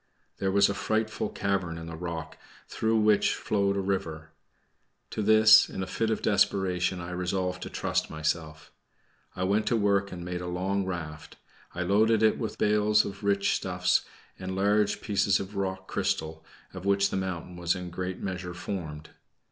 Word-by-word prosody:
There 95 Hz, -1 st, 0 dB
was 100 Hz, +1 st, +5 dB
a 100 Hz, -, -1 dB
frightful 110 Hz, +1 st, -1 dB
cavern 95 Hz, -4 st, -2 dB
in 80 Hz, -, -7 dB
the 85 Hz, 0 st, -7 dB
rock, 85 Hz, -1 st, -5 dB, 0.3 s
through 110 Hz, 0 st, 0 dB
which 105 Hz, -1 st, +3 dB
flowed 100 Hz, -1 st, 0 dB
a -, -, +1 dB
river. 80 Hz, -5 st, -3 dB, 0.8 s
To -, -, -2 dB
this, 110 Hz, +1 st, +7 dB
in 95 Hz, -, -4 dB
a -, -, -3 dB
fit 115 Hz, +4 st, -1 dB
of 110 Hz, -, -1 dB
desperation, 95 Hz, -3 st, +1 dB
I 85 Hz, 0 st, -6 dB
resolved 90 Hz, 0 st, -2 dB
to -, -, -5 dB
trust -, -, -1 dB
myself. 80 Hz, 0 st, -3 dB, 0.6 s
I 90 Hz, -, -2 dB
went 100 Hz, +3 st, +1 dB
to 120 Hz, -, +2 dB
work 100 Hz, -1 st, +1 dB
and 85 Hz, -1 st, -7 dB
made 90 Hz, 0 st, -4 dB
a 90 Hz, -, -5 dB
long 95 Hz, +2 st, -1 dB
raft. 80 Hz, -4 st, -6 dB, 0.4 s
I 90 Hz, -, -1 dB
loaded 110 Hz, +4 st, +3 dB
it 110 Hz, -, +3 dB
with 110 Hz, -, -4 dB
bales 105 Hz, 0 st, +3 dB
of 100 Hz, +2 st, -7 dB
rich 100 Hz, -1 st, +2 dB
stuffs, -, -, +1 dB, 0.4 s
and 95 Hz, 0 st, -4 dB
large 105 Hz, +1 st, +2 dB
pieces 100 Hz, -2 st, +2 dB
of 100 Hz, +1 st, -7 dB
rock 95 Hz, -1 st, -3 dB
crystal, 80 Hz, 0 st, -2 dB, 0.3 s
of 95 Hz, -1 st, -8 dB
which 100 Hz, 0 st, +2 dB
the -, -, -2 dB
mountain 90 Hz, -2 st, -4 dB
was 85 Hz, +1 st, 0 dB
in 90 Hz, -1 st, -5 dB
a -, -, -6 dB
great 90 Hz, +1 st, -4 dB
measure 90 Hz, -2 st, -5 dB
formed. 80 Hz, -5 st, -6 dB
95 Hz, 180 wpm, -28 LUFS, 90-100 Hz, 0.8 s, this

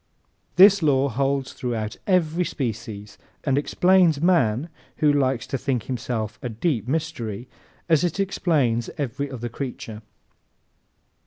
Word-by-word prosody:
This 200 Hz, +1 st, +7 dB
law 140 Hz, -3 st, +3 dB
holds 135 Hz, +2 st, -1 dB
throughout 110 Hz, -4 st, -3 dB
every 180 Hz, -2 st, +2 dB
species 110 Hz, -, -5 dB, 0.2 s
and 135 Hz, -3 st, +1 dB
explains 175 Hz, +2 st, +3 dB
man 155 Hz, -6 st, +2 dB, 0.3 s
who 150 Hz, -1 st, +3 dB
likes 130 Hz, -4 st, +1 dB
to 135 Hz, -, -3 dB
think 125 Hz, -3 st, -1 dB
himself 120 Hz, -4 st, -4 dB
a 125 Hz, -, -4 dB
deep 115 Hz, -, -1 dB
mystery 125 Hz, -7 st, -3 dB, 0.4 s
as 160 Hz, -2 st, +3 dB
it 175 Hz, +2 st, -1 dB
explains 150 Hz, -12 st, +1 dB
every 140 Hz, 0 st, -3 dB
other 120 Hz, -3 st, -5 dB
creature. 120 Hz, -3 st, -6 dB
135 Hz, 125 wpm, -24 LUFS, 115-160 Hz, 0.4 s, This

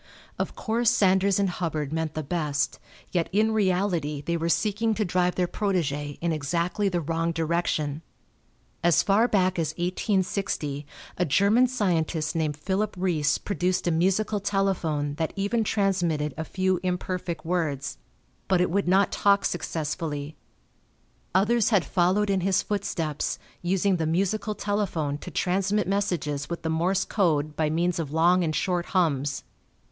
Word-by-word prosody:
Of -, -, -2 dB
course 230 Hz, +1 st, +1 dB
Sanders 190 Hz, 0 st, +3 dB
and 200 Hz, -1 st, +2 dB
Hubbard 160 Hz, -5 st, -3 dB
meant 160 Hz, -1 st, -2 dB
the 155 Hz, -, -2 dB
best, 145 Hz, -2 st, -1 dB, 0.3 s
yet 170 Hz, -3 st, 0 dB
in 215 Hz, +3 st, +2 dB
reality 180 Hz, -7 st, 0 dB
they 170 Hz, +2 st, -1 dB
were 165 Hz, 0 st, -1 dB
seeking 215 Hz, +4 st, +1 dB
to 215 Hz, -, 0 dB
drive 180 Hz, 0 st, +1 dB
their 180 Hz, -1 st, +1 dB
protégé 150 Hz, -8 st, -1 dB
in 170 Hz, 0 st, 0 dB
exactly 170 Hz, +6 st, 0 dB
the 180 Hz, -2 st, 0 dB
wrong 165 Hz, +1 st, -1 dB
direction. 160 Hz, -2 st, -1 dB, 0.8 s
As 170 Hz, -2 st, +4 dB
far 210 Hz, +4 st, +3 dB
back 185 Hz, -5 st, +1 dB
as 160 Hz, -1 st, -1 dB
1860 180 Hz, -5 st, -1 dB, 0.3 s
a 180 Hz, -, +3 dB
German 200 Hz, -, +4 dB
scientist 170 Hz, -9 st, 0 dB
named 155 Hz, -3 st, -1 dB
Philipp 195 Hz, +6 st, -1 dB
Reis 160 Hz, -5 st, +1 dB
produced 185 Hz, -2 st, -1 dB
a 175 Hz, -, +2 dB
musical 190 Hz, +6 st, +1 dB
telephone 185 Hz, -8 st, 0 dB
that 160 Hz, -, -1 dB
even 205 Hz, +3 st, 0 dB
transmitted 175 Hz, -9 st, 0 dB
a 160 Hz, -, -4 dB
few 185 Hz, 0 st, 0 dB
imperfect 180 Hz, -2 st, -3 dB
words. 155 Hz, -6 st, -2 dB, 0.5 s
But 190 Hz, -2 st, +3 dB
it 180 Hz, -1 st, +1 dB
would 200 Hz, +1 st, 0 dB
not 190 Hz, +1 st, +4 dB
talk 200 Hz, 0 st, +3 dB
successfully. 155 Hz, -3 st, -3 dB, 1.0 s
Others 210 Hz, +3 st, +3 dB
had 200 Hz, -6 st, +3 dB
followed 195 Hz, +3 st, +2 dB
in 190 Hz, -1 st, +1 dB
his 190 Hz, +1 st, +2 dB
footsteps, 165 Hz, -7 st, -2 dB, 0.2 s
using 190 Hz, +1 st, +1 dB
the 160 Hz, -2 st, -1 dB
musical 200 Hz, +5 st, 0 dB
telephone 175 Hz, -9 st, -1 dB
to -, -, -8 dB
transmit 195 Hz, +2 st, 0 dB
messages 175 Hz, -8 st, -1 dB
with 170 Hz, -, -5 dB
the 160 Hz, -, -1 dB
Morse 180 Hz, +4 st, +1 dB
code 155 Hz, -7 st, +1 dB
by 155 Hz, 0 st, +1 dB
means 170 Hz, +2 st, 0 dB
of 150 Hz, -4 st, -3 dB
long 175 Hz, +3 st, +4 dB
and 155 Hz, -2 st, -1 dB
short 180 Hz, 0 st, 0 dB
hums. 145 Hz, -5 st, +1 dB
180 Hz, 150 wpm, -26 LUFS, 160-195 Hz, 1.0 s, As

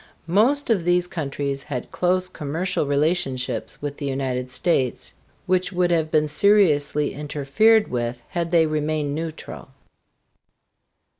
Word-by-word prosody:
Most 235 Hz, -, +2 dB
of 195 Hz, -6 st, +2 dB
these 175 Hz, +1 st, +2 dB
countries 140 Hz, -4 st, -3 dB
had 135 Hz, -4 st, -6 dB
close 185 Hz, +1 st, +1 dB
commercial 165 Hz, 0 st, -2 dB
relationships 140 Hz, -3 st, -1 dB
with 145 Hz, -1 st, -4 dB
the 145 Hz, -, -4 dB
United 130 Hz, -2 st, -2 dB
States, 130 Hz, -1 st, -1 dB, 0.3 s
which 185 Hz, +1 st, +1 dB
would 180 Hz, -1 st, +1 dB
have 160 Hz, -2 st, +1 dB
been 155 Hz, -1 st, +2 dB
seriously 150 Hz, -4 st, +3 dB
interfered 150 Hz, +10 st, +2 dB
with 120 Hz, -1 st, -3 dB
had 170 Hz, -1 st, -2 dB
they 165 Hz, -1 st, +4 dB
remained 155 Hz, -1 st, -1 dB
neutral. 160 Hz, +1 st, -6 dB
155 Hz, 125 wpm, -23 LUFS, 140-180 Hz, 0.3 s, they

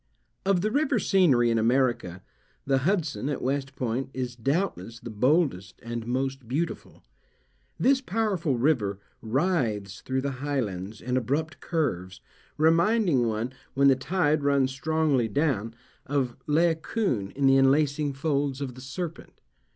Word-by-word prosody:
Of 195 Hz, -3 st, +3 dB
the 215 Hz, +3 st, 0 dB
river 280 Hz, -1 st, +2 dB
scenery 145 Hz, -, +3 dB
of 115 Hz, -, +2 dB
America, 115 Hz, -7 st, +1 dB, 0.4 s
the 135 Hz, -1 st, +2 dB
Hudson, 155 Hz, -3 st, -1 dB
at 145 Hz, -, -2 dB
West 135 Hz, +1 st, -2 dB
Point, 130 Hz, +2 st, -2 dB
is 125 Hz, -2 st, -3 dB
doubtless 125 Hz, -, -2 dB
the 120 Hz, -, -8 dB
boldest 125 Hz, -, +1 dB
and 115 Hz, -1 st, -5 dB
most 130 Hz, 0 st, -2 dB
beautiful. 150 Hz, +8 st, -4 dB, 0.8 s
This 270 Hz, 0 st, +3 dB
powerful 190 Hz, -, 0 dB
river 115 Hz, -7 st, +1 dB, 0.2 s
writhes 115 Hz, -, -1 dB
through 130 Hz, 0 st, -2 dB
the 140 Hz, +1 st, -2 dB
highlands 110 Hz, -8 st, -3 dB
in 125 Hz, +1 st, -1 dB
abrupt 145 Hz, +5 st, -2 dB
curves, 95 Hz, -, -2 dB, 0.4 s
reminding 165 Hz, -, +3 dB
one, 115 Hz, +3 st, -2 dB, 0.2 s
when 140 Hz, +1 st, +5 dB
the 135 Hz, -, +5 dB
tide 155 Hz, +2 st, +1 dB
runs 140 Hz, -2 st, +2 dB
strongly 150 Hz, -3 st, +1 dB
down, 115 Hz, -3 st, -1 dB, 0.3 s
of 135 Hz, -3 st, -1 dB
Laocoon 160 Hz, -, +1 dB
in 140 Hz, 0 st, 0 dB
the 135 Hz, 0 st, +6 dB
enlacing 140 Hz, +2 st, +2 dB
folds 140 Hz, -1 st, -1 dB
of 135 Hz, -3 st, -4 dB
the 130 Hz, -, -12 dB
serpent. 160 Hz, +6 st, -7 dB
135 Hz, 135 wpm, -27 LUFS, 120-160 Hz, 0.8 s, the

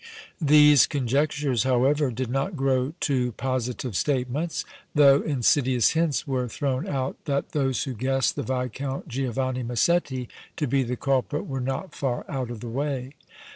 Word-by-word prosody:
These 150 Hz, -2 st, +7 dB
conjectures, 140 Hz, -1 st, 0 dB
however, 130 Hz, +4 st, +2 dB
did 125 Hz, 0 st, -4 dB
not 135 Hz, +8 st, -1 dB
grow 135 Hz, 0 st, 0 dB
to 125 Hz, -4 st, 0 dB
positive 125 Hz, -2 st, -3 dB
statements, 140 Hz, -, -1 dB, 0.3 s
though 140 Hz, -1 st, +6 dB
insidious 130 Hz, -3 st, +2 dB
hints 165 Hz, -3 st, 0 dB
were 130 Hz, -2 st, -1 dB
thrown 130 Hz, +2 st, -2 dB
out 135 Hz, -1 st, -3 dB
that 140 Hz, -2 st, -1 dB
those 135 Hz, -3 st, 0 dB
who 135 Hz, -, -4 dB
guessed 130 Hz, +3 st, 0 dB
the -, -, -2 dB
Viscount 130 Hz, +2 st, -3 dB
Giovanni 130 Hz, -1 st, -2 dB
Massetti 130 Hz, +1 st, 0 dB, 0.3 s
to 155 Hz, -, 0 dB
be 135 Hz, +1 st, +1 dB
the 125 Hz, 0 st, -2 dB
culprit 135 Hz, 0 st, 0 dB
were 135 Hz, -2 st, -4 dB
not 135 Hz, +9 st, -3 dB
far 130 Hz, -3 st, -2 dB
out 130 Hz, -4 st, -3 dB
of 120 Hz, -3 st, -7 dB
the 120 Hz, -, -6 dB
way. 135 Hz, +1 st, -3 dB
135 Hz, 150 wpm, -25 LUFS, 125-145 Hz, 0.3 s, These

